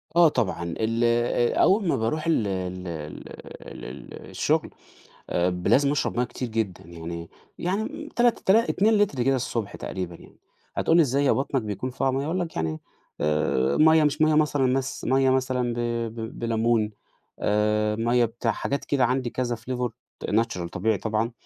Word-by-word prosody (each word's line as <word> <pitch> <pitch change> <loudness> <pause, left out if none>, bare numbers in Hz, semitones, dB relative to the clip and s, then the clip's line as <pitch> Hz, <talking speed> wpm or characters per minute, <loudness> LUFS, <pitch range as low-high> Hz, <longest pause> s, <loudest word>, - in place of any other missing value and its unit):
آه 170 -1 +7
طبعًا. 110 -11 -1 0.2
ال 115 +1 0
آآ 120 0 +2
أول 195 -1 +3
ما - - +2
باروح 155 +9 -1
ال 135 -10 +2
ال 90 -1 -4
ال 75 -3 -9
ال 60 - -10
الشغل، - - 0 0.6
آآ 90 +1 +2
ب 90 0 -3
لازم 140 +1 +4
أشرب 145 - -1
مَيّة 125 - +2
كتير 125 +1 -5
جدًا، 110 -5 -3
يعني 85 0 -7 0.3
يعني 220 - -3
تلات 240 -1 +3
تلا 220 +5 +3
2 215 +3 +3
لتر 165 -12 +1
كده 135 +2 +3
الصبح 115 -5 -3
تقريبًا 90 -2 -5
يعني، - - -17 0.4
هتقول 165 - +3
لي - - +7
إزاي 140 -1 +2
هي - - +4
بطنك 135 0 0
بيكون 105 +4 -4
فيها 130 +1 0
مَيّة؟ 135 +1 -1
هاقول 170 +4 -1
لك 170 -3 -4
يعني 80 -1 -2 0.4
آآ 75 -4 +1
مَيّة 160 0 +6
مش 150 0 +1
مَيّة 155 0 +4
مثلًا 150 -3 +2
مث 130 +1 -1
مَيّة 135 +1 +3
مثلًا 130 -2 +1
ب - - -7 0.4
ب 110 -1 -6
بلمون، 115 -1 +1 0.5
آآ 105 0 +1
مَيّة 120 +2 +2
بتاع 115 +1 -2
حاجات 140 - -3
كده 135 -3 +2
عندي 125 0 0
كذا 120 -1 -2
flavor 125 +2 -3 0.4
natural 105 -6 0
طبيعي 110 +3 0
طبعًا، 110 +2 -1
120 Hz, 175 wpm, -25 LUFS, 105-140 Hz, 0.6 s, آه